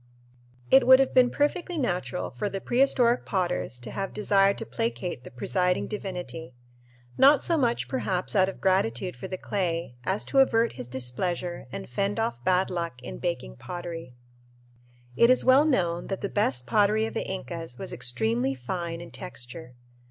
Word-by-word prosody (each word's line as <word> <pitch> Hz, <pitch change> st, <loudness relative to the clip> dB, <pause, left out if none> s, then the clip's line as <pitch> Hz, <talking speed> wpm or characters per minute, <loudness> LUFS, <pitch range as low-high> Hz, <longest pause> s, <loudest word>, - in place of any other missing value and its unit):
It 265 Hz, -1 st, +6 dB
would 260 Hz, 0 st, +10 dB
have 270 Hz, 0 st, +1 dB
been 255 Hz, -1 st, +6 dB
perfectly 340 Hz, +5 st, -1 dB
natural 180 Hz, -, -2 dB
for 210 Hz, -, -3 dB
the 195 Hz, -, -4 dB
prehistoric 245 Hz, 0 st, +2 dB
potters 180 Hz, -8 st, -1 dB
to -, -, -5 dB
have 195 Hz, -1 st, -4 dB
desired 200 Hz, -1 st, +3 dB
to 225 Hz, -, -4 dB
placate 190 Hz, -, -3 dB
the -, -, -9 dB
presiding 180 Hz, +9 st, 0 dB
divinity, 180 Hz, -8 st, -6 dB, 0.6 s
not 275 Hz, +1 st, +6 dB
so 340 Hz, -, +1 dB
much 245 Hz, -6 st, +1 dB
perhaps 190 Hz, -7 st, -1 dB
out 190 Hz, -1 st, +4 dB
of -, -, -8 dB
gratitude 185 Hz, -4 st, +1 dB
for 125 Hz, -, -7 dB
the 185 Hz, -, -4 dB
clay 170 Hz, -10 st, -2 dB
as 120 Hz, -1 st, -1 dB
to 270 Hz, -, +2 dB
avert 230 Hz, -3 st, +4 dB
his -, -, -8 dB
displeasure 130 Hz, +8 st, -3 dB
and -, -, -6 dB
fend 200 Hz, -, -1 dB
off 225 Hz, -, -2 dB
bad 185 Hz, +4 st, +2 dB
luck 170 Hz, -7 st, -3 dB
in -, -, -7 dB
baking 60 Hz, 0 st, -3 dB
pottery. 165 Hz, -, -7 dB, 1.0 s
It 235 Hz, -, +5 dB
is 255 Hz, -, +4 dB
well 260 Hz, +3 st, +6 dB
known 175 Hz, -, +1 dB
that 195 Hz, -, -4 dB
the 200 Hz, -, -2 dB
best 130 Hz, -, 0 dB
pottery 210 Hz, -, +3 dB
of 225 Hz, -, -5 dB
the -, -, -3 dB
Incas 165 Hz, -7 st, -6 dB
was -, -, -6 dB
extremely 120 Hz, +1 st, -1 dB
fine 165 Hz, +6 st, -4 dB
in 170 Hz, -, -10 dB
texture. 125 Hz, -6 st, -8 dB
185 Hz, 170 wpm, -27 LUFS, 135-225 Hz, 1.0 s, would